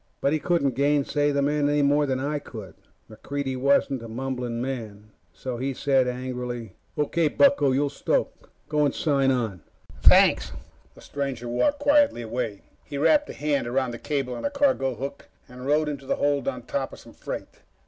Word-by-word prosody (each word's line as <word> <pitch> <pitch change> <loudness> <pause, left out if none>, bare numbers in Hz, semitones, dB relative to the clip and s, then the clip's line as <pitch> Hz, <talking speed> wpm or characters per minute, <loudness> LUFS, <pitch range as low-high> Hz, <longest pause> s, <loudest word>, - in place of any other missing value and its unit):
But 140 - +1
he 155 - +1
couldn't 150 -6 +1
gainsay 145 +2 +1
the 140 -1 +1
man 145 0 +1
any 145 0 +2
more 145 +1 +3
than 130 -1 0
I 145 +2 -1
could. 110 -10 -10 0.3
MacReidie 140 -2 -4
wasn't 135 0 +2
a 115 - -8
mumbling 125 0 -4
man, 110 -5 -5 0.2
so 125 +8 -5
he 135 +2 -2
said 135 -2 +2
angrily: 125 -3 -4 0.2
"O.K., 155 +2 +1
bucko, 265 - +4
you'll 140 +2 +1
stoke. 140 - -2 0.2
Go 150 -1 +1
and 145 - +1
sign 140 -4 +2
on." 115 -9 -1 0.4
"Thanks." - - +5 0.4
The - - -15
stranger 135 -4 -4
walked 285 - +1
quietly 290 - +4
away. 115 -3 -4 0.2
He 140 - -6
wrapped 295 - +3
a - - -5
hand 145 -4 -1
around 130 +1 0
the 120 - -7
cable 135 -4 -2
on - - -6
a 285 - +1
cargo 270 - +1
hook 135 +5 -7 0.2
and 125 +1 -9
rode 150 +1 +2
into 140 -2 -5
the - - +1
hold 145 -2 0
on 125 -3 -3
top 135 +2 -3
of - - -9
some - - -15
freight. - - -7
135 Hz, 185 wpm, -25 LUFS, 125-145 Hz, 0.4 s, Thanks